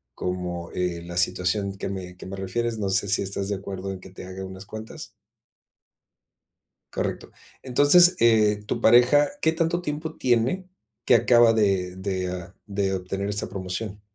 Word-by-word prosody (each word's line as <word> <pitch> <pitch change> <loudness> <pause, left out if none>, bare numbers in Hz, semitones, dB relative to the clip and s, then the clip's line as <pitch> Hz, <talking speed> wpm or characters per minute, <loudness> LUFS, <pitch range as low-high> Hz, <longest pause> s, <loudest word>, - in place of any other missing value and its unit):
como, 90 -1 -4
eh, 90 -2 -2
la 85 0 -7
situación 90 +2 0
que 95 - -5
me 90 -2 -6
que 90 - -10
me 95 - -6
refieres, 115 +4 -2
no 100 -2 -2
sé 95 +1 +1
si 100 +1 +2
estás 100 +1 -3
de 100 - 0
acuerdo 95 0 -6
en 95 - -7
que 95 - -13
te 90 - -10
haga 95 +1 -7
unas 95 0 -10
cuantas. 110 0 -9 1.8
Correcto. - - -3 0.3
Entonces, 145 +8 +6
eh, 105 -3 +4
tu - - -2
pareja, 125 +6 +5
¿qué 160 - +3
tanto 165 +1 0
tiempo 155 0 -4
tiene 130 +10 +1 0.4
que - - +5
acaba 120 -1 +5
de 95 -4 +1
de, 95 -1 -3
ah, 90 0 -7
de 100 -2 -1
obtener 95 +2 -3
esta 105 0 -2
promoción? 95 +2 -4
100 Hz, 165 wpm, -25 LUFS, 95-120 Hz, 1.8 s, Entonces